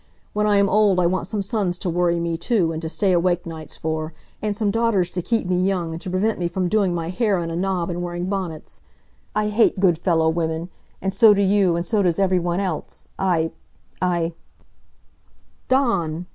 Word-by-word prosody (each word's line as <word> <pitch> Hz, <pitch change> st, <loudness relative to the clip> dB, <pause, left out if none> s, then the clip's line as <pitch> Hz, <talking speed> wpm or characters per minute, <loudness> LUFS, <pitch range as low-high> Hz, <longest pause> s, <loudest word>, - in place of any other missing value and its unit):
When 210 Hz, 0 st, +1 dB
I 205 Hz, -1 st, +4 dB
am 200 Hz, 0 st, +4 dB
old 200 Hz, -2 st, +3 dB
I 180 Hz, -, +3 dB
want 175 Hz, 0 st, 0 dB
some 205 Hz, 0 st, -2 dB
sons 195 Hz, -4 st, -1 dB
to 180 Hz, -, -5 dB
worry 175 Hz, 0 st, +1 dB
me, 170 Hz, 0 st, -1 dB
too, 175 Hz, -2 st, +1 dB
and 160 Hz, 0 st, -4 dB
to 160 Hz, -, -4 dB
stay 195 Hz, +3 st, +1 dB
awake 175 Hz, 0 st, +1 dB
nights 160 Hz, -3 st, -8 dB
for, 160 Hz, 0 st, -3 dB, 0.3 s
and 210 Hz, -1 st, -2 dB
some 210 Hz, -2 st, +1 dB
daughters 215 Hz, -5 st, +1 dB
to 180 Hz, -, -3 dB
keep 225 Hz, +4 st, 0 dB
me 180 Hz, 0 st, +1 dB
young, 185 Hz, -4 st, 0 dB
and 165 Hz, +1 st, -6 dB
to -, -, -5 dB
prevent 195 Hz, +4 st, 0 dB
me 175 Hz, -, 0 dB
from 180 Hz, +1 st, -1 dB
doing 195 Hz, -4 st, +2 dB
my 165 Hz, -1 st, -3 dB
hair 205 Hz, +1 st, +1 dB
in 165 Hz, -1 st, -3 dB
a -, -, -3 dB
knob 180 Hz, -1 st, -1 dB
and 175 Hz, +1 st, -4 dB
wearing 175 Hz, 0 st, -3 dB
bonnets! 185 Hz, -5 st, -5 dB, 0.5 s
I 210 Hz, 0 st, +1 dB
hate 210 Hz, -2 st, +2 dB
good 175 Hz, -4 st, +3 dB
fellow 165 Hz, -3 st, +2 dB
women, 160 Hz, +1 st, -1 dB, 0.3 s
and 195 Hz, 0 st, -1 dB
so 210 Hz, +1 st, +6 dB
do 200 Hz, -, +1 dB
you, 195 Hz, -3 st, +3 dB
and 170 Hz, +1 st, -2 dB
so 215 Hz, 0 st, +1 dB
does 175 Hz, -4 st, +1 dB
every 190 Hz, -2 st, +2 dB
one 175 Hz, +1 st, -1 dB
else! 185 Hz, -6 st, -4 dB
I 170 Hz, -4 st, +1 dB, 0.5 s
I 175 Hz, -2 st, 0 dB, 0.6 s
" -, -, -38 dB
"Dawn!" 185 Hz, -, +1 dB
180 Hz, 215 wpm, -22 LUFS, 170-200 Hz, 0.6 s, so